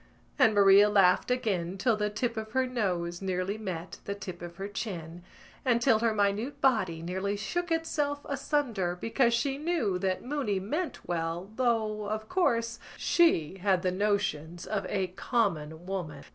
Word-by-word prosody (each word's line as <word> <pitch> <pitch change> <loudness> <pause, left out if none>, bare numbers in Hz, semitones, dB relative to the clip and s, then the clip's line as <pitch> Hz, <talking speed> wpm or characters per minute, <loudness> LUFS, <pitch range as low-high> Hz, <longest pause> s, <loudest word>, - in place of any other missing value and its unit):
And 225 -5 +5
Maria 200 +1 +7
laughed 195 -1 +4
again 195 -8 -1
till 225 +3 +2
the 210 0 -1
tip 230 +3 -2
of 220 0 -5
her 260 0 +2
nose 180 -8 -2
nearly 185 +1 -1
met 185 -4 -5
the 200 - -3
tip 185 -3 -8
of 175 0 -8
her 195 +3 -5
chin 175 -5 -5 0.4
and 245 -3 +3
till 235 -3 +4
her 230 0 +2
minute 210 +5 0
body 185 -11 +2
nearly 190 +4 -2
shook 350 - -3
itself 295 -3 -1
asunder 265 - -1
because 235 +3 +2
she 275 +3 -1
knew 295 - 0
that 185 +2 -1
Mooney 255 -8 -1
meant 300 - -4
well 170 +3 -3
though, 220 -4 0
of 215 0 -3
course, 230 -10 +1 0.2
she 195 - +2
had 190 -1 +2
the 185 - +2
notions 180 -5 -1
of 210 -2 -2
a 195 -2 0
common 175 -6 -1
woman. 175 -7 -5
205 Hz, 160 wpm, -29 LUFS, 180-240 Hz, 0.4 s, Maria